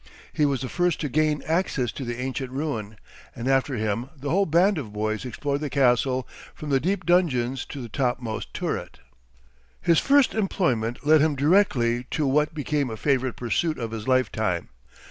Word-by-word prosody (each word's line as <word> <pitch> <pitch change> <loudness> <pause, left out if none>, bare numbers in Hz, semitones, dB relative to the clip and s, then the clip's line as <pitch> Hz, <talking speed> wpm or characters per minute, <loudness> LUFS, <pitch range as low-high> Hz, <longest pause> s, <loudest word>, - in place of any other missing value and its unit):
He 150 - +2
was 135 -3 -1
the - - -3
first 175 +3 0
to 150 - -2
gain 155 +1 +1
access 160 - 0
to 135 - -6
the 120 -1 -4
ancient 130 0 -3
ruin, 125 -7 -4 0.4
and 120 +2 -4
after 135 0 +2
him 110 +3 -2
the 140 +1 -4
whole 195 +3 +2
band 175 +3 +3
of 115 -8 -7
boys 110 +3 -2
explored 140 +4 -2
the 150 - -2
castle, 130 -1 +2 0.3
from 150 -1 -6
the 135 - +4
deep 185 +5 -1
dungeons 135 -8 +2
to 140 -3 -7
the - - -6
topmost 120 -2 -2
turret. - - -4 0.8
His 170 -2 +3
first 280 -2 +4
employment 135 - -1
led 155 0 +6
him 155 -1 +2
directly 135 -7 +2
to 155 - -1
what 150 +3 +1
became 145 -2 -1
a 110 - -5
favorite 130 0 0
pursuit 155 +7 -1
of 115 -2 -4
his 110 0 -6
lifetime. 110 -8 0
135 Hz, 180 wpm, -25 LUFS, 120-155 Hz, 0.8 s, led